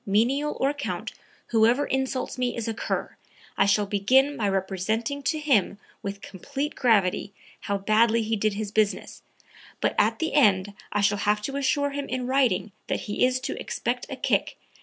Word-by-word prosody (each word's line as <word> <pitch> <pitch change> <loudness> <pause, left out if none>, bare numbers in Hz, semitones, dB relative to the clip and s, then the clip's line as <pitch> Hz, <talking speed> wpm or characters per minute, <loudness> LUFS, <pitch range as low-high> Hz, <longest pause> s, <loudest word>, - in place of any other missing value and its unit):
Menial 250 +9 +1
or 275 +2 +2
count, 285 -1 -4 0.4
whoever 235 +5 +3
insults 265 -1 -2
me 250 -2 -1
is 230 - -3
a 225 - -1
cur. 225 - -3 0.4
I 195 - +3
shall 205 +1 +3
begin 255 +9 +3
by 210 -6 0
representing 195 +8 -1
to 310 +3 0
him, 260 -10 +2 0.2
with 200 0 -5
complete 275 - -4
gravity, 205 -4 +2 0.3
how 200 - -2
badly 220 +3 +3
he 220 +1 0
did 215 -1 0
his 210 -1 -4
business, 210 -1 0 0.6
but - - +1
at - - +3
the 320 -1 -2
end 205 -8 +3 0.2
I 205 - +1
shall 205 0 +2
have 210 +1 +1
to 275 - -4
assure 280 +1 +1
him 285 0 -4
in 255 0 -2
writing 245 -7 +1 0.2
that - - -1
he 205 - -1
is 255 0 +3
to - - -4
expect - - -3
a - - -4
kick... - - 0
225 Hz, 180 wpm, -26 LUFS, 205-270 Hz, 0.6 s, whoever